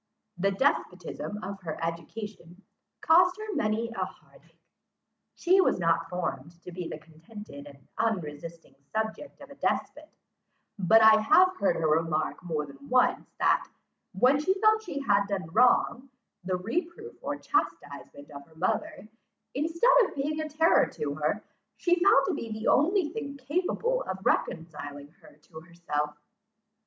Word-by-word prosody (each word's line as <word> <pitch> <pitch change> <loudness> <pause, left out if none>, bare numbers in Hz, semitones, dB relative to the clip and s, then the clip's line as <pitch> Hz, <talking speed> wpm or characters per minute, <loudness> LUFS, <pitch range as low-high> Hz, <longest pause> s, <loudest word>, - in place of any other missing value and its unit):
The 190 +2 +1
despotism 210 -2 -2
of 195 +1 -6
her 160 -4 -5
education 175 +2 -6 0.4
cost 360 +3 +5
her 430 -1 -5
many 220 - -1
a 195 -5 -2
heart - - -12
ache. - - -30 0.8
She 370 +2 +4
was - - +2
not 165 -1 +1
formed 170 -2 -5
to 180 - -9
be 175 -1 -5
the - - -6
contented 160 0 -12
and 140 -1 -16
unresisting 165 -8 -3 0.2
subject 220 +6 -4
of 280 -1 -12
a - - -11
despot; - - -2 0.7
but 220 +4 +5
I 220 0 +7
have 370 +11 +5
heard 200 - +1
her 160 - 0
remark 155 0 0
more 155 -4 -2
than 140 0 -14
once, 255 0 +2
that, - - +2 0.4
when 255 +9 +4
she 375 +6 +1
felt 435 +1 +4
she 290 -9 -5
had 200 -5 +2
done 195 -4 -3
wrong, 250 +3 +3 0.3
the 185 0 -1
reproof 340 - -4
or - - -3
chastisement 145 - -3
of 140 -1 -9
her 160 - -22
mother, 255 - -2 0.5
instead 330 - +2
of - - -8
being 300 +3 -2
a 310 - -4
terror 320 +3 +3
to 145 -1 -3
her, 155 +8 -2 0.3
she 350 +8 +2
found 405 +3 +5
to 375 - -1
be 230 -7 -5
the 220 +1 -4
only 345 +3 +3
thing 280 -7 -6
capable 365 - -1
of 190 0 -6
reconciling 145 -3 -2
her - - -17
to 160 - -12
herself. 150 -3 -4
205 Hz, 155 wpm, -28 LUFS, -, 0.8 s, I